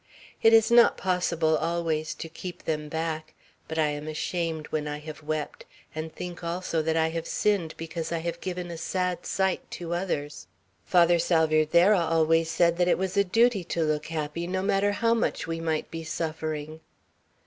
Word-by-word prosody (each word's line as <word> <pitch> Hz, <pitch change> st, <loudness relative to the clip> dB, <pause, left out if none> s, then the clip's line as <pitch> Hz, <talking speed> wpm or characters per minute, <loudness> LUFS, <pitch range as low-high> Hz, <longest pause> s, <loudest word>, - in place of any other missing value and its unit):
It 225 Hz, -, +6 dB
is 225 Hz, 0 st, +5 dB
not 235 Hz, 0 st, +6 dB
possible 170 Hz, -3 st, +1 dB
always 160 Hz, -1 st, -1 dB
to -, -, -6 dB
keep 175 Hz, +2 st, -8 dB
them 150 Hz, -1 st, -2 dB
back; 160 Hz, 0 st, -3 dB, 0.3 s
but 160 Hz, -, -5 dB
I 155 Hz, -2 st, +3 dB
am 150 Hz, +1 st, -5 dB
ashamed 160 Hz, 0 st, -2 dB
when 150 Hz, -1 st, -1 dB
I 150 Hz, 0 st, -3 dB
have 155 Hz, +1 st, -9 dB
wept, 155 Hz, 0 st, -4 dB, 0.3 s
and 155 Hz, +1 st, -5 dB
think 175 Hz, +1 st, -7 dB
also 170 Hz, -1 st, -1 dB
that 160 Hz, +1 st, 0 dB
I 160 Hz, 0 st, +2 dB
have 165 Hz, 0 st, -4 dB
sinned, 195 Hz, -7 st, 0 dB
because 165 Hz, 0 st, -5 dB
I 170 Hz, -, 0 dB
have 170 Hz, +1 st, -4 dB
given 180 Hz, -1 st, -4 dB
a 165 Hz, -, -6 dB
sad 180 Hz, +1 st, -2 dB
sight 190 Hz, -1 st, 0 dB
to 170 Hz, -1 st, -5 dB
others. 150 Hz, -, -3 dB, 0.4 s
Father 175 Hz, -1 st, +5 dB
Salvierderra 165 Hz, +3 st, +4 dB
always 165 Hz, 0 st, +2 dB
said 170 Hz, 0 st, +2 dB
that 175 Hz, 0 st, +2 dB
it -, -, +3 dB
was 190 Hz, 0 st, -2 dB
a 200 Hz, -, +5 dB
duty 225 Hz, +1 st, +3 dB
to 170 Hz, -1 st, -1 dB
look 155 Hz, -1 st, -1 dB
happy, 160 Hz, +1 st, -3 dB
no 185 Hz, +1 st, -1 dB
matter 200 Hz, 0 st, +2 dB
how 230 Hz, +2 st, +2 dB
much 230 Hz, -, 0 dB
we 165 Hz, 0 st, -3 dB
might 160 Hz, -2 st, -2 dB
be 165 Hz, 0 st, -5 dB
suffering." 155 Hz, -1 st, -4 dB
165 Hz, 180 wpm, -27 LUFS, 155-180 Hz, 0.4 s, It